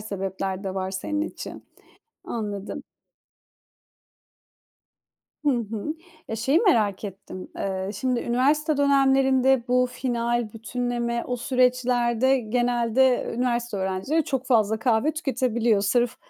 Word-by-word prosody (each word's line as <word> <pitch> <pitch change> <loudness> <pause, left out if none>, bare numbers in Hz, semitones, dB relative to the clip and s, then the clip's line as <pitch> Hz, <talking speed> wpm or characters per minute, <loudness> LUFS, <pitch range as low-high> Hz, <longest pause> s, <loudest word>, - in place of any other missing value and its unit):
sebepler 195 -1 -4
de 190 - -3
var 190 -1 -2
senin 195 +11 -3
için. 320 - -7 0.6
Anladım. 205 -3 -5 2.6
Hı 290 - +4
hı. 230 +3 -2 0.3
Eee, 225 - -3
şeyi 265 +8 +2
merak 215 - +2
ettim. 190 -2 -8
Eee, 190 0 -3
şimdi 250 +3 -1
üniversite 290 +5 +1
dönemlerinde 270 -2 +3
bu 250 0 +3
final, 240 -3 -1
bütünleme, 235 +1 -2
o 250 - -2
süreçlerde 250 0 +2
genelde 240 +2 +1
üniversite 240 -2 -1
öğrencileri 190 +12 0
çok 265 -1 -2
fazla 220 -4 +2
kahve 235 +5 +2
tüketebiliyor. 240 - +1
Sırf 240 +4 +1
240 Hz, 105 wpm, -25 LUFS, 215-260 Hz, 2.6 s, Hı